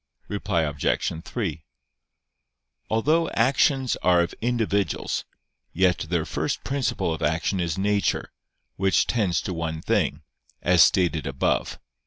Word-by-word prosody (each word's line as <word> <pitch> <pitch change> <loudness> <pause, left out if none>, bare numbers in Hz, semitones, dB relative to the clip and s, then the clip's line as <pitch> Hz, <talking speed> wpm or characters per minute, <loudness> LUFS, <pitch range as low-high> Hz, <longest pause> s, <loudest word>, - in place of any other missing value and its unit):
Reply 85 - -1
Obj. 75 +2 -1
3: 95 -7 -4 1.3
Although 155 +9 +2
actions 130 +1 +2
are 90 -1 +3
of 85 - -2
individuals, 110 -6 -1 0.5
yet 90 -1 +2
their 85 -3 0
first - - -2
principle 130 -11 -1
of 80 - -6
action 80 +5 0
is 85 -3 -1
nature, 100 +1 0 0.5
which 95 0 +3
tends 100 -8 0
to 95 - -4
one 80 -1 -3
thing, 80 - 0 0.4
as 90 0 +5
stated 85 -5 +2
above 70 -1 0
(A. - - -25
90 Hz, 125 wpm, -25 LUFS, 80-110 Hz, 1.3 s, as